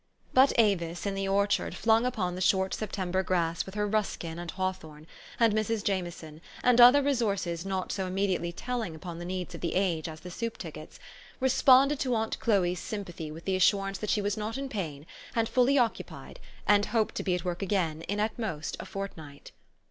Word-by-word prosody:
But 265 +2 +6
Avis 175 -6 +2
in 200 - -1
the 195 0 -2
orchard, 200 +1 +1
flung, 225 +2 +3
upon 190 -8 -2
the 180 - -5
short 190 0 +2
September 190 -3 -2
grass 170 -3 0
with 190 - -9
her 210 0 0
Ruskin 195 -6 -2
and 175 -1 -6
Hawthorne, 160 -5 -4 0.3
and 230 -3 +4
Mrs. 215 0 0
Jameson, 175 -6 -3 0.2
and 245 -1 +5
other 255 +4 +8
resources 200 -10 -1
not 190 -1 -2
so 190 -2 -2
im 185 - -5
mediately 190 -3 0
telling 225 -2 -4
upon 170 +1 -7
the 175 - -6
needs 180 -1 -4
of - - -8
the 170 - -2
age 175 -4 0
as 155 0 -9
the 180 - -9
soup 230 +4 -4
tickets, - - -9 0.4
responded 265 +2 +5
to 255 -3 0
aunt 220 0 -1
Chloe's 180 -6 +1
sympathy 175 -7 -6
with 160 +2 -10
the 190 - +1
assurance 195 +1 +2
that 210 - -4
she 210 - +1
was 205 0 0
not 215 +3 -4
in 275 0 -4
pain, 155 - -5 0.3
and 225 -1 +2
fuUy 260 +2 +4
occupied, 235 -3 -3 0.3
and 205 0 +4
hoped 220 -1 0
to - - -3
be 185 -2 0
at 180 - -5
work 175 +1 -3
again 175 -5 0
in 205 +1 -2
at 215 +2 -1
most 175 -10 -3
a - - -6
fortnight. 160 -8 -8
195 Hz, 200 wpm, -29 LUFS, 175-220 Hz, 0.4 s, other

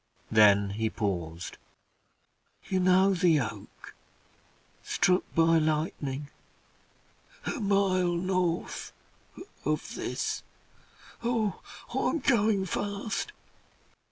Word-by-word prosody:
Then 100 -2 +5
he 110 +2 -1
paused. 90 -6 -4 1.1
"You 190 - +1
know 185 +2 +4
the 170 -4 +4
oak 105 -5 -7 0.9
struck 180 +1 +2
by 165 0 +5
lightning 150 -3 -1 1.2
a - - -2
mile 195 -4 +2
north 180 -1 -1 0.7
of - - -2
this. - - -3 0.8
Oh! 230 -4 0 0.3
I'm - - +1
going 220 -8 +2
fast. 205 - -3
180 Hz, 80 wpm, -29 LUFS, 130-195 Hz, 1.2 s, Then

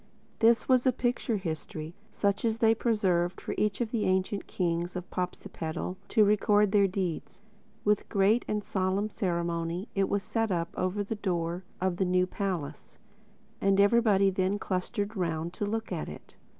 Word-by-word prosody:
This 230 0 +4
was 255 0 +4
a - - +6
picture 240 -2 -1
history, 160 -3 -5 0.2
such 200 -1 0
as 225 -1 +1
they 225 -1 +5
preserved 185 -6 +1
for - - -4
each 210 +1 0
of 230 -2 -1
the 225 -3 0
ancient 190 +2 0
kings 175 0 -1
of 180 0 -5
Popsipetel 180 -1 -4
to 215 -3 +4
record 205 0 +3
their 200 -1 +5
deeds. 185 0 -4 0.4
With 210 -1 +2
great 205 +4 +3
and 210 -1 -1
solemn 190 +2 0
ceremony 170 -1 -2
it 195 -1 +1
was 200 -1 0
set 225 0 -1
up 170 -1 0
over 185 +3 -1
the 200 - -3
door 180 -3 -2
of 185 -1 0
the 190 - +1
new 180 0 +3
palace: 185 -6 -4 0.6
and 195 0 +3
everybody 200 -2 +4
then 190 +2 0
clustered 200 +3 -2
round 170 -2 -2
to 205 - -3
look 225 0 -3
at 170 -4 -3
it. 75 - -11
195 Hz, 165 wpm, -29 LUFS, 180-210 Hz, 0.6 s, a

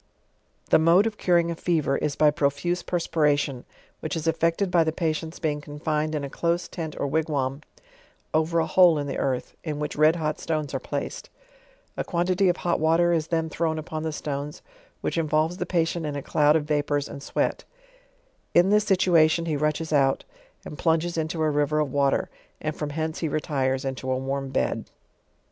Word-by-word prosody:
The - - +7
mode 170 +6 +5
of 220 -2 -3
curing 170 -2 +3
a - - -3
fever, 160 -5 0
is 145 - -1
by 150 -1 +4
profuse 150 +5 0
perspiration, 150 -6 0 0.3
which 155 0 -4
is 160 -1 -3
effected 165 +3 +1
by 170 -2 +5
the 160 - 0
patients 160 0 -2
being 150 -3 -2
confined 155 +1 -2
in 145 - -2
a - - -3
close 170 +1 -1
tent 160 -4 -6
or - - 0
wigwam, 140 -2 -1 0.7
over 160 +2 +1
a 165 - +3
hole 175 -1 +5
in 145 - -2
the 140 - -3
earth, 130 -2 -2
in 155 -3 -3
which 150 0 -3
red 155 +2 +5
hot 155 -2 -2
stones 155 -3 -2
are 135 - -1
placed; 140 +2 -5 0.7
a - - -2
quant'ty 180 +2 +1
of 175 - +1
hot 175 - 0
water 165 +2 +3
is 160 -2 0
then 165 -1 0
thrown 160 0 -1
upon 155 0 -5
the 160 0 -2
stones, 145 -1 -5 0.4
which - - -1
involves 155 +2 +1
the - - -3
patient 165 -2 0
in 145 - -3
a 140 - -4
cloud 150 0 +3
of 160 - +2
va 150 -1 +1
pours 145 0 -1
and 140 - -8
sweat; - - -1 0.9
in 175 +3 +5
this 210 0 +4
situation 170 -4 +3
he 160 -2 -1
rushes 150 +2 -1
out; 135 -2 +3 0.4
and 150 - -8
plunges 165 0 +1
into 160 0 -1
a 155 - +3
river 150 +1 +1
of 150 -3 0
water, 140 -1 +1 0.3
and 155 0 -3
from 150 - -4
hence 160 +1 -3
he 165 - -1
retires 135 -3 -1
into 130 -1 -4
a 130 - +1
warm 135 +1 -3
bed. 130 - -1
155 Hz, 195 wpm, -25 LUFS, 145-165 Hz, 0.9 s, The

